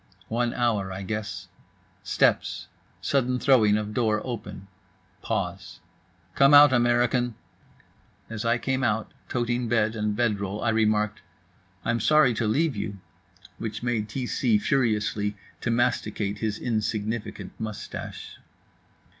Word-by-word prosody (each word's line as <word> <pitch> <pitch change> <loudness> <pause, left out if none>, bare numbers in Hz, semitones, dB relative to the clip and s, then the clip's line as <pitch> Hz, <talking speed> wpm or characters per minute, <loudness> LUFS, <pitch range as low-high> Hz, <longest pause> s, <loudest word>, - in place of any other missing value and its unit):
One 120 +1 0
hour, 110 -6 0
I 95 +1 -5
guess. 105 -3 -4 0.5
Steps. 100 - +1 0.3
Sudden 125 -2 +1
throwing 115 -6 +4
of 105 0 -4
door 110 -2 +1
open. 115 -5 -6 0.5
Pause. - - -3 0.5
"Come 140 +1 +6
out, 145 -2 +9
American." 120 0 +2 0.9
As 110 0 -5
I 115 +1 +2
came 130 +2 -1
out, 110 -2 0 0.2
toting 120 0 -1
bed 110 -1 +1
and 105 -1 -1
bed 110 -3 +1
roll, 100 +1 -4
I 120 - +2
remarked: 110 -1 +1 0.6
"I'm 120 0 +1
sorry 135 +1 +4
to 115 0 -1
leave 145 +5 +1
you," 100 0 -4 0.6
which 110 0 -5
made 115 -3 -1
T 125 +4 -3
c 215 - +2
furiously 110 - 0 0.2
to - - -3
masticate 115 -4 0
his 110 -2 -1
insignificant 110 -1 -3
moustache. 110 -2 -7
115 Hz, 125 wpm, -26 LUFS, 105-120 Hz, 0.9 s, out